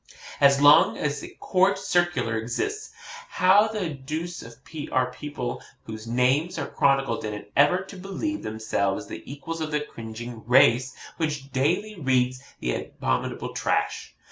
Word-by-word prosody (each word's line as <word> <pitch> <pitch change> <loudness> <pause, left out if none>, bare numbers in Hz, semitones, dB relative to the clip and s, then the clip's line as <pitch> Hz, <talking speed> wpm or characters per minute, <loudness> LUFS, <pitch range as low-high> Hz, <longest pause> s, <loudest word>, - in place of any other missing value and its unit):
As 140 0 +6
long 145 +1 +6
as 150 -1 -2
a - - -7
COURT 190 +1 +2
CIRCULAR 175 - +1
exists, 120 - -3 0.4
how 195 - +5
the 210 -6 -3
deuce 155 +5 -5 0.5
are 125 -1 +1
people 145 -4 -5 0.2
whose 110 0 -8
names 130 +9 +1
are 145 - -2
chronicled 135 -1 +1
in 105 -1 -3
it 105 0 -10
ever 145 +7 +4
to 190 0 -11
believe 195 - -4
themselves 110 -3 -2
the - - -8
equals 160 +4 -6
of 155 - -2
the 150 -1 0
cringing 115 -4 -8
race 130 0 +5 0.2
which 150 -4 -3
daily 170 +11 0
reads 130 -2 +1 0.2
that 60 - -3
abominable - - -2
trash? - - -1
140 Hz, 140 wpm, -25 LUFS, 120-175 Hz, 0.5 s, As